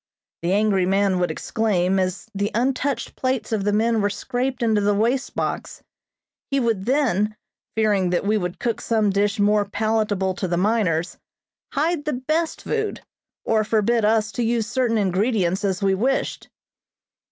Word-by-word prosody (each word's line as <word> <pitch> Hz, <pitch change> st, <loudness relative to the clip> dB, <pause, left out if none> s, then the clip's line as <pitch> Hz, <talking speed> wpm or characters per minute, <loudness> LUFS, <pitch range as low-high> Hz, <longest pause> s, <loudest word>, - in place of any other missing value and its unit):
the 170 Hz, +2 st, -1 dB
angry 200 Hz, -2 st, +2 dB
man 195 Hz, -1 st, +2 dB
would 180 Hz, -, +1 dB
exclaim, 195 Hz, -4 st, 0 dB
as 185 Hz, +3 st, -2 dB
the 200 Hz, +1 st, -1 dB
untouched 260 Hz, +1 st, -1 dB
plates 255 Hz, -4 st, -2 dB
of 215 Hz, -3 st, 0 dB
the 205 Hz, -, +1 dB
men 225 Hz, +1 st, +2 dB
were 205 Hz, -, +2 dB
scraped 245 Hz, +4 st, -2 dB
into 220 Hz, -2 st, +2 dB
the 205 Hz, 0 st, +2 dB
waste 240 Hz, +6 st, 0 dB
box. -, -, -3 dB, 0.7 s
He 275 Hz, -, +1 dB
would 225 Hz, -5 st, 0 dB
then, 220 Hz, -7 st, +1 dB, 0.4 s
fearing 205 Hz, -4 st, +2 dB
that 175 Hz, +2 st, 0 dB
we 210 Hz, +2 st, +2 dB
would 180 Hz, -4 st, -2 dB
cook 235 Hz, -2 st, -2 dB
some 215 Hz, -3 st, +1 dB
dish 200 Hz, +1 st, +1 dB
more 205 Hz, 0 st, +3 dB
palatable 205 Hz, -2 st, 0 dB
to 185 Hz, 0 st, -3 dB
the 175 Hz, 0 st, -1 dB
miners, 185 Hz, -4 st, 0 dB, 0.5 s
hide 305 Hz, +1 st, 0 dB
the 300 Hz, -, -1 dB
best 310 Hz, +6 st, -1 dB
food, 435 Hz, -2 st, -2 dB, 0.4 s
or 220 Hz, -1 st, +2 dB
forbid 220 Hz, +2 st, +1 dB
us 220 Hz, +1 st, +2 dB
to 240 Hz, -, -2 dB
use 230 Hz, -1 st, +1 dB
certain 235 Hz, 0 st, 0 dB
ingredients 195 Hz, -1 st, +1 dB
as 195 Hz, -1 st, -1 dB
we 195 Hz, -1 st, +3 dB
wished. 250 Hz, +8 st, -1 dB
215 Hz, 165 wpm, -22 LUFS, 195-235 Hz, 0.7 s, more